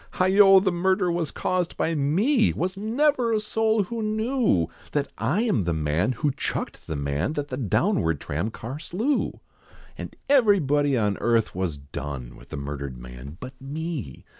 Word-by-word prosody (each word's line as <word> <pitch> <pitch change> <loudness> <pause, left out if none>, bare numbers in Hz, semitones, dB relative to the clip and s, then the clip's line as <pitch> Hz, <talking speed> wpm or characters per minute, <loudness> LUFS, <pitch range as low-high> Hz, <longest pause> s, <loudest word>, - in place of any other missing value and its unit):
Heigho! 195 +1 +6
the 190 0 +1
murder 185 +1 +1
was 170 -3 -1
caused 180 -2 -2
by 165 - 0
me, 195 - +2
Was 185 +3 -2
never 240 +3 +1
a 215 - +2
soul 220 0 +1
who 230 +4 -5
knew, 220 - +1 0.3
That 145 -1 -1
I 150 - +1
am 215 - +2
the 85 -2 0
man, 80 +9 0
who 145 +2 0
chucked 135 - -4
the 80 - -3
man, 70 - -1
That 145 -1 -3
the 130 - -4
townward 80 - +1
tram 85 +9 -2
car 120 +5 -7
slew! 225 - -1 0.5
And - - -8
everybody 150 - +4
on 105 -3 0
earth 115 -2 +2
was 90 -5 -2
done 70 -3 -7
With - - -16
the - - -6
murdered 70 -2 -5
man, 60 +5 -10
but 130 +1 -8
me! 145 - -5
145 Hz, 165 wpm, -25 LUFS, -, 0.5 s, Heigho